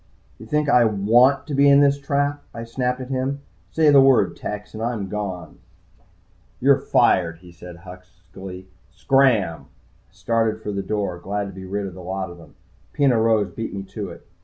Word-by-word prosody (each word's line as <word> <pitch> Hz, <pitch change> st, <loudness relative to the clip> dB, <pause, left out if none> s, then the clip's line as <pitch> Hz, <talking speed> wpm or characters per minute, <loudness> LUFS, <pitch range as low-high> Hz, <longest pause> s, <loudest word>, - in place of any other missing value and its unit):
"You 110 Hz, -, -11 dB
think 150 Hz, +3 st, 0 dB
I 125 Hz, -4 st, +5 dB
want 120 Hz, +6 st, +3 dB
to 145 Hz, -, -6 dB
be 140 Hz, +1 st, +4 dB
in 140 Hz, 0 st, +6 dB
this 140 Hz, 0 st, +3 dB
trap?" 145 Hz, +1 st, -1 dB
I 115 Hz, -, -6 dB
snapped 125 Hz, +2 st, -2 dB
at 130 Hz, -, -8 dB
him. 135 Hz, +2 st, -2 dB, 0.3 s
"Say 155 Hz, -2 st, +3 dB
the 140 Hz, -1 st, +7 dB
word, 135 Hz, -2 st, +4 dB
Tex, 105 Hz, 0 st, -7 dB
and 110 Hz, -, -7 dB
I'm 115 Hz, -4 st, -3 dB
gone." 95 Hz, -6 st, -6 dB, 1.0 s
"You're 140 Hz, +2 st, +4 dB
fired," 90 Hz, -11 st, +2 dB
he 90 Hz, +1 st, -16 dB
said 85 Hz, 0 st, -12 dB
huskily. 90 Hz, +1 st, -11 dB, 0.2 s
"Scram!" 125 Hz, -, +1 dB, 0.4 s
I -, -, -34 dB
started 110 Hz, +3 st, -1 dB
for 105 Hz, -1 st, -5 dB
the 100 Hz, -1 st, -3 dB
door, 100 Hz, -3 st, -3 dB
glad 100 Hz, +2 st, -4 dB
to -, -, -11 dB
be 95 Hz, 0 st, -9 dB
rid 100 Hz, +2 st, -3 dB
of 95 Hz, -, -7 dB
the 90 Hz, -, -11 dB
lot 95 Hz, 0 st, -4 dB
of 85 Hz, -, -13 dB
them. 80 Hz, -, -17 dB, 0.4 s
Peno 135 Hz, -5 st, +2 dB
Rose 110 Hz, -3 st, +2 dB
beat 115 Hz, -2 st, -6 dB
me 95 Hz, -, -5 dB
to 100 Hz, 0 st, -7 dB
it. 85 Hz, -, -13 dB
110 Hz, 190 wpm, -22 LUFS, 95-130 Hz, 1.0 s, the